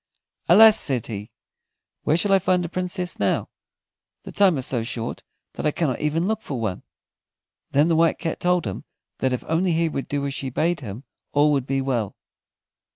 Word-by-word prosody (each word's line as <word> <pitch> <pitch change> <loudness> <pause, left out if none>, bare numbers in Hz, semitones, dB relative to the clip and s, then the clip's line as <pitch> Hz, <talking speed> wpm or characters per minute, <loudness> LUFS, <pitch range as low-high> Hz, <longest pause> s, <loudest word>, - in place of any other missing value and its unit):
"Alas!" 220 +4 +8
said 125 -4 -1
he, 105 -1 -6 0.7
"where 155 - +2
shall 200 +3 +1
I 195 - +6
find 180 -1 +1
a - - -5
Princess 180 0 -3
now? 100 - 0 0.7
The - - -9
time 195 -6 +4
is 130 - -1
so 120 -3 -1
short 115 0 -4 0.3
that - - -5
I - - +4
cannot 150 -4 -1
even 155 +3 0
look 220 +1 -1
for 135 - -5
one." 110 -5 -3 0.9
Then 145 +3 +3
the 165 - +2
White 165 0 +3
Cat 165 -2 -3
told 180 -1 +1
him 95 - -5 0.4
that 130 - +1
if 125 - -2
only 170 +2 +1
he 165 0 +1
would 135 -3 -4
do 140 -1 -2
as 140 - -2
she 135 -1 -3
bade 165 +6 0
him 115 0 -8 0.3
all 150 +1 +4
would 140 -3 0
be 135 0 0
well. 120 -7 -2
150 Hz, 195 wpm, -23 LUFS, 130-175 Hz, 0.9 s, Alas